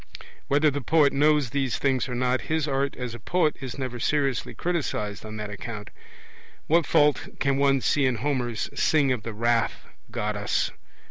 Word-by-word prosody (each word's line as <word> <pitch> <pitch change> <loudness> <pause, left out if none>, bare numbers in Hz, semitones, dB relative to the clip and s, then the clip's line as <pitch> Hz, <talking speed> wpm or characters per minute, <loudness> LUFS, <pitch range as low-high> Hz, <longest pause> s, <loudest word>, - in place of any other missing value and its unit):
Whether 145 +2 +3
the 145 +1 -3
poet 150 +1 +3
knows 145 -3 +3
these 135 -3 0
things 135 -1 0
or 125 - -3
not, 125 +1 +1
his 160 -1 +1
art 140 0 0
as 125 -2 -5
a 120 - -8
poet 160 +4 +1
is 130 -1 -6
never 130 -3 -4
seriously 140 -1 0
criticized 120 - -2
on 110 0 -7
that 105 -1 -5
account. 105 0 -7 0.7
What 165 0 +3
fault 145 -1 +3
can 140 0 +1
one 135 -1 +3
see 140 +1 +2
in 130 - +1
Homer's 120 -2 -1
'Sing 145 -4 +2
of 125 -3 -1
the 115 - -5
wrath, 115 0 0 0.2
Goddess'? 105 -3 -1
130 Hz, 175 wpm, -26 LUFS, 115-145 Hz, 0.7 s, Whether